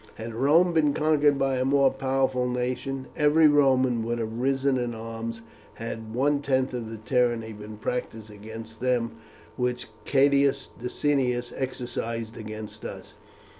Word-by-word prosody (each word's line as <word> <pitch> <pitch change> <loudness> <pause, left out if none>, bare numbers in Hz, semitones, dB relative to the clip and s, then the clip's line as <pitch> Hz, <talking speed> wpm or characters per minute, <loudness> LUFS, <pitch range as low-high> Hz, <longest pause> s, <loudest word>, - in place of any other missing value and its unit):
Had 115 +1 -6
Rome 155 +9 +4
been 150 -3 +3
conquered 150 -2 +3
by 135 -1 +1
a - - +2
more 135 0 +4
powerful 130 -1 0
nation, 125 +2 -2
every 150 +2 +5
Roman 130 -5 +3
would 120 +1 -1
have 115 0 -4
risen 135 0 +1
in 120 -1 -2
arms 115 +1 -6 0.3
had 115 -1 -6
one 140 +3 +2
tenth 130 -2 +1
of 120 -3 -4
the 115 - -6
tyranny 115 0 0
been 105 +1 -9
practised 110 -1 -4
against 110 +2 -10
them 125 -2 +1 0.5
which 125 -1 -2 0.2
Catus 140 0 +3
Decianus 125 -1 0
exercised 115 -3 -4
against 110 -1 -8
us. - - -8
125 Hz, 140 wpm, -26 LUFS, 115-135 Hz, 0.5 s, every